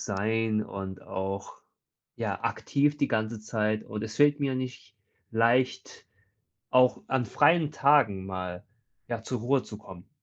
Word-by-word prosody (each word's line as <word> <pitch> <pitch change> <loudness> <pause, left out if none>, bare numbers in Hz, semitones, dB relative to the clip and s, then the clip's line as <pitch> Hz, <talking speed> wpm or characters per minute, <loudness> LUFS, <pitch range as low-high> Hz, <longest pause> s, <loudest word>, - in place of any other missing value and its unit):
sein 110 +2 0
und 95 -1 -7
auch, 95 +1 -5 0.6
ja, - - -3
aktiv 145 +1 +1
die 140 - +1
ganze 110 0 -1
Zeit.“ 110 0 -1
Und 105 0 -6
es 110 0 -7
fällt 145 0 +4
mir 135 -2 0
nicht 130 -1 -6 0.3
leicht, 120 +3 +1 0.6
auch 125 0 +4
an 130 -1 +1
freien 160 +7 +3
Tagen 130 -11 +3
mal, 90 0 -5 0.4
ja, 115 -2 -3
zur 125 +1 -4
Ruhe 130 +3 +2
zu 105 - -10
kommen. 95 -4 -13
110 Hz, 140 wpm, -28 LUFS, 105-130 Hz, 0.6 s, fällt